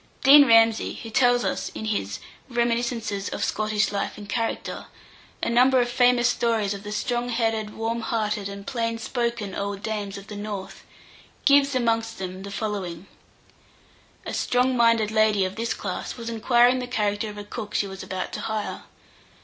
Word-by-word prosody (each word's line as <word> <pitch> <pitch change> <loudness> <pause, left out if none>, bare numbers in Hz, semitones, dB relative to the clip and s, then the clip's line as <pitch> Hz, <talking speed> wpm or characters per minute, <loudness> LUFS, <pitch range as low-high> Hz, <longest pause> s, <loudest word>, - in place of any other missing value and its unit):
Dean 285 +1 +9
Ramsay, 225 -1 +4
who 225 - -8
tells 245 0 +3
us, - - -2
in 220 - -5
his 100 - -2 0.3
"Reminiscences 235 -4 -1
of - - -3
Scottish 215 0 0
Life 200 - -3
and 205 - -9
Character," 230 +2 -3 0.6
a - - +1
number 255 +2 +5
of 245 0 +1
famous 245 0 +4
stories 225 -4 +1
of 200 - -7
the 210 0 -7
strong 240 +3 -1
headed, 225 -3 -1
warm 225 +1 -2
hearted, 215 -3 -1
and 200 0 -8
plain 230 -1 -2
spoken 235 -3 -2
old 200 0 -4
dames 205 -3 -3
of 200 - -10
the 210 - -9
north, 205 -2 -6 0.6
gives, 280 -1 +5
amongst 230 -2 0
them, 185 0 -6
the 200 - -7
following: 195 -4 -4 1.2
A - - -5
strong 250 +1 +1
minded 230 -3 +3
lady 215 -3 +3
of 185 +1 -4
this 230 +1 -2
class 185 +3 -5
was 235 -1 -5
inquiring 240 +2 +4
the 250 - -4
character 210 -3 -1
of 210 - -9
a 205 - -6
cook 210 0 -7
she - - +2
was 195 -1 -8
about 185 0 -5
to - - -4
hire. 215 -1 -4
225 Hz, 175 wpm, -25 LUFS, 205-240 Hz, 1.2 s, Dean